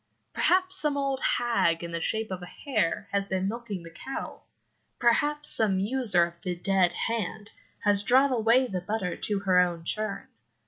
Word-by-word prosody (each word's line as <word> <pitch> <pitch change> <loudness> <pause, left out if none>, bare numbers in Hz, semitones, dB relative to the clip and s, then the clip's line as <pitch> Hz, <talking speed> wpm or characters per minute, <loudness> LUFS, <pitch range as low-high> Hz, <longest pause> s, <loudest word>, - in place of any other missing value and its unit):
Perhaps 370 +1 +3
some 295 -2 0
old 275 -1 -1
hag 230 -12 +1
in 170 - -6
the 170 0 -3
shape 220 +3 -2
of 185 -1 -5
a 180 - -8
hare 210 - -2
has 200 0 -1
been 190 0 -1
milking 215 -4 -5
the 165 - -11
cattle. 265 +10 -7 0.5
Perhaps 295 +5 +2
some 205 -4 +3
user 205 -3 +2
of 170 0 -12
"the 180 -2 -3
dead 185 0 +1
hand" 220 -2 -3 0.3
has 205 -1 +3
drawn 260 +6 +4
away 240 +2 +3
the 190 -7 -4
butter 195 -2 -3
to 205 -2 -1
her 185 -2 +3
own 175 -2 0
churn. 215 +3 -2
205 Hz, 175 wpm, -27 LUFS, 180-245 Hz, 0.5 s, drawn